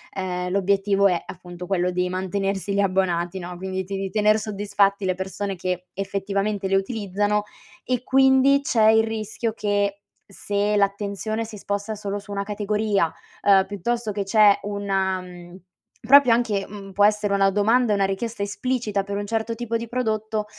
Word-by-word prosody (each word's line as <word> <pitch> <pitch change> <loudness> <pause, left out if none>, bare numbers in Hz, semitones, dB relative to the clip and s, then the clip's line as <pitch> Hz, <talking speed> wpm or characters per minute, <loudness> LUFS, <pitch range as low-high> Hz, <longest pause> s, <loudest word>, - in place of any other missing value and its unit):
ehm, 180 -1 -3
l'obiettivo 200 +1 +2
è 175 -2 0
appunto 180 -1 -9
quello 180 -2 0
di 180 0 0
mantenersi 195 +1 -2
gli 200 - 0
abbonati, 185 -2 0
no, 180 0 -7
quindi 190 0 -4
ti 195 +2 -6
di 195 0 -3
tener 215 +1 +3
soddisfatti 200 -1 0
le 185 - +1
persone 190 +1 -4
che 180 0 -3
effettivamente 195 +1 -2
le 195 - +3
utilizzano, 205 0 -1 0.4
e 250 -1 -1
quindi 265 +1 +4
c'è 220 -5 +3
il 220 0 +4
rischio 220 +1 -3
che, 205 -2 0 0.3
se 205 +1 -1
l'attenzione 200 +2 -1
si 220 -1 -9
sposta 200 +2 -3
solo 205 -1 -4
su 205 0 -12
1 200 0 -2
categoria, 210 -3 0 0.3
ehm, 195 -1 +5
piuttosto 220 +3 -2
che 200 0 -2
c'è 205 0 +5
una 195 -2 -1
mhmm, 175 0 -12 0.5
proprio 275 -2 +7
anche 215 -5 0
uhm, 195 -1 -10
può 205 +1 +4
essere 210 -1 +2
una 195 0 +3
domanda 225 +4 +2
e 205 - +3
una 195 -1 +2
richiesta 210 +3 -3
esplicita 210 0 -1
per 200 0 -4
un 205 - -4
certo 225 +1 -1
tipo 230 0 -2
di 230 0 -6
prodotto, 220 -3 -2
200 Hz, 170 wpm, -23 LUFS, 195-215 Hz, 0.5 s, proprio